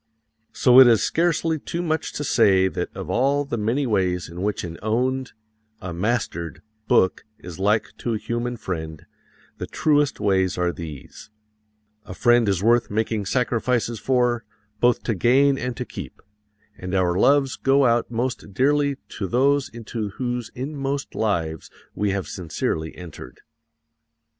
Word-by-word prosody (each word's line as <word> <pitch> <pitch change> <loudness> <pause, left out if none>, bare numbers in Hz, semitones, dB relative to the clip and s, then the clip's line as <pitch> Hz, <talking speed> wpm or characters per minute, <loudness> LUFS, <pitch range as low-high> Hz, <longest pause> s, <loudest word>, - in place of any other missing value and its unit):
So 125 0 +6
it 130 - +10
is 115 -3 +4
scarcely 165 -1 +1
too 170 +4 -4
much 160 -2 -1
to 145 - -3
say 95 -8 +4
that - - -3
of - - -5
all 140 +3 +2
the 140 - -3
many 115 +6 0
ways 90 -7 0
in 85 +2 -8
which 105 +1 -1
an 85 -2 -7
owned 125 +4 -1 0.5
a 90 -3 -6
mastered 90 -3 -2 0.2
book 95 - +3
is 90 0 -10
like 105 +2 +1
to 115 -2 -1
a - - 0
human 120 +2 -3
friend, 80 -6 -6 0.5
the - - -4
truest 145 -2 +1
ways 95 -3 +1
are 90 0 +1
these: 80 -2 -9 0.8
A 90 - -8
friend 120 -1 +4
is 95 -1 0
worth 120 +2 +3
making 110 -1 -1
sacrifices 120 -1 0
for, 125 -2 +1 0.4
both 120 0 +2
to 115 - 0
gain 135 +6 +3
and 125 -1 -4
to 125 - -3
keep; - - -9 0.6
and 90 +1 -4
our 90 -2 +2
loves 135 +6 +3
go 135 +1 +3
out 120 -1 +2
most 120 -4 -3
dearly 140 +2 +2
to 100 - -4
those 140 +6 +2
into 115 -2 -5
whose 125 -2 -3
inmost 140 +1 -4
lives 80 -8 -2 0.2
we 105 - -1
have 95 -1 -2
sincerely 80 -2 -3
entered. 90 -4 -11
115 Hz, 155 wpm, -23 LUFS, 95-130 Hz, 0.8 s, it